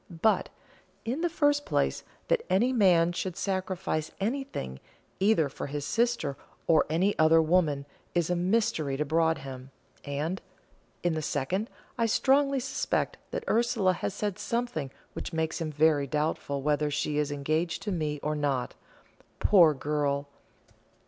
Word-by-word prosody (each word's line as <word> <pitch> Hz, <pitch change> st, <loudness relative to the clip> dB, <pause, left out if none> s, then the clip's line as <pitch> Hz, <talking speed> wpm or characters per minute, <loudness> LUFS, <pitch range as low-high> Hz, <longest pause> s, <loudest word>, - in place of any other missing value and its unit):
But, 220 Hz, -, +3 dB, 0.6 s
in 255 Hz, +7 st, -2 dB
the 345 Hz, -, +1 dB
first 290 Hz, -3 st, +2 dB
place, -, -, 0 dB, 0.3 s
that -, -, +2 dB
any 235 Hz, +7 st, +3 dB
man 175 Hz, -7 st, +4 dB
should 175 Hz, 0 st, -4 dB
sacrifice 185 Hz, -4 st, -2 dB
anything, 215 Hz, -, -3 dB, 0.4 s
either 195 Hz, -6 st, +3 dB
for 140 Hz, -, -6 dB
his 145 Hz, 0 st, -4 dB
sister 235 Hz, -, 0 dB, 0.3 s
or 160 Hz, -2 st, +4 dB
any 185 Hz, +6 st, +2 dB
other 160 Hz, +1 st, +6 dB
woman, 155 Hz, -4 st, +2 dB, 0.3 s
is 175 Hz, 0 st, +1 dB
a -, -, +2 dB
mystery 175 Hz, -7 st, +1 dB
to 150 Hz, -, 0 dB
Broadhem; 140 Hz, -5 st, -1 dB, 0.3 s
and, 150 Hz, +6 st, -3 dB, 0.6 s
in 175 Hz, -1 st, +2 dB
the 155 Hz, -, -2 dB
second, 165 Hz, -, -1 dB, 0.3 s
I 230 Hz, -, +3 dB
strongly 275 Hz, +4 st, +3 dB
suspect 260 Hz, +1 st, -1 dB
that -, -, -4 dB
Ursula 225 Hz, -5 st, +2 dB
has 185 Hz, -, -3 dB
said 205 Hz, -1 st, -2 dB
something 235 Hz, -, -2 dB, 0.2 s
which -, -, -6 dB
makes 160 Hz, 0 st, -1 dB
him 155 Hz, -1 st, -2 dB
very 150 Hz, -1 st, +3 dB
doubtful 145 Hz, -1 st, -1 dB
whether 150 Hz, 0 st, +1 dB
she 150 Hz, 0 st, -1 dB
is 150 Hz, -1 st, 0 dB
engaged 155 Hz, +4 st, -1 dB
to 205 Hz, -, -2 dB
me 155 Hz, -4 st, -2 dB
or 150 Hz, -, 0 dB
not. 140 Hz, -4 st, -1 dB, 0.6 s
Poor 170 Hz, -7 st, +6 dB
girl! 145 Hz, 0 st, -1 dB
165 Hz, 145 wpm, -28 LUFS, 150-205 Hz, 0.6 s, other